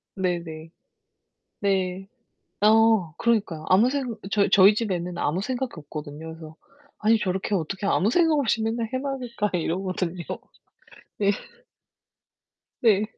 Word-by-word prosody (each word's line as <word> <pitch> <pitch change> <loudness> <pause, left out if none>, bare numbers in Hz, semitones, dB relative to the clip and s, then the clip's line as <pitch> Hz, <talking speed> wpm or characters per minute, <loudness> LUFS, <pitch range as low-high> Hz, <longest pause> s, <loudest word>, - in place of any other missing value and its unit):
네네. 170 -4 -3 0.9
네. 190 -1 -1 0.5
어, 215 -5 +4
그러니까요. 205 -9 0
아무 215 +7 +5
생 265 -5 -2 0.2
저희 200 -1 +3
저희 200 +1 +7
집 215 -2 -2
애는 175 0 -3
아무 165 +6 0
생각이 255 +1 -3
없거든요. 150 +1 -8
그래서 160 -1 -11 0.4
'아니 220 +1 +3
저렇게 190 +1 -1
어떻게 190 +3 -2
아무 200 +2 +2
생각 325 +1 +3
없이 230 -4 +1
맨날 225 0 -1
해 255 - 0
맑을까.' 250 -6 -3
이러거든요. 180 0 -2 0.9
네. 200 -1 +3 1.5
네. 215 -3 +4
195 Hz, 265 characters per minute, -25 LUFS, 175-225 Hz, 1.5 s, 저희